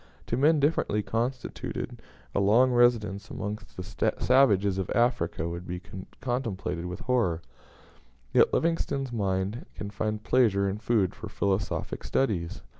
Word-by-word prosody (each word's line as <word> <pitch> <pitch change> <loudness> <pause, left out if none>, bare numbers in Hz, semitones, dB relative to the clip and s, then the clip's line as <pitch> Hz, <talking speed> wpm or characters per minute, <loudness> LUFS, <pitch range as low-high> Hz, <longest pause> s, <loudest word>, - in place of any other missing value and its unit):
To - - -1
men 150 +5 +4
differently 140 -8 +1
constituted, 120 +4 -3 0.3
a - - +1
long 115 +6 +5
residence 110 -4 +2
amongst 105 +2 -6
the 105 +3 -1
savages 100 -7 +4
of 95 - -3
Africa 120 -8 +1
would 85 +1 -6
be 90 0 -4 0.4
contemplated 110 -9 -2
with 90 0 -6
horror, 115 -10 +1 0.9
yet - - +5
Livingstone's 140 -5 0
mind 100 - -1
can 100 -1 -6
find 105 +1 -2
pleasure 105 -7 +3
and 100 +2 -3
food 105 -5 +2
for - - -8
philosophic 95 -1 -1
studies. 95 -11 -1
105 Hz, 130 wpm, -28 LUFS, 95-125 Hz, 0.9 s, long